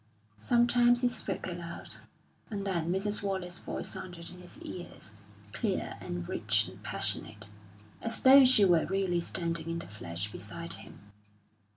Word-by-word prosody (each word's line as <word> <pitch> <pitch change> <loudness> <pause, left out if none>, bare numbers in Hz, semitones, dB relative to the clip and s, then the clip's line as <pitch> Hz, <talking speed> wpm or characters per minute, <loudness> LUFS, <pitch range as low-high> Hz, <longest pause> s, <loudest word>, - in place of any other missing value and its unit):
Sometimes 240 - +4
he 250 - +4
spoke 245 - -2
aloud, - - -4 0.5
and 200 -3 -4
then 170 -4 0
Mrs. 205 +3 +1
Wallace's 190 -3 -2
voice - - -3
sounded 175 -2 -6
in 180 - -12
his 180 -1 -9
ears, 175 - -6 0.4
clear - - -1
and 90 0 -5
rich - - +1
and - - -12
passionate, 100 - -2 0.5
as 230 0 +1
though 270 +1 +9
she 250 -5 +7
were 175 -3 +4
really 190 -2 +1
standing 170 -2 -2
in 165 - -1
the - - -6
flesh 100 -1 -2
beside 95 -2 -4
him. 100 +4 -11
180 Hz, 150 wpm, -31 LUFS, 160-205 Hz, 0.5 s, though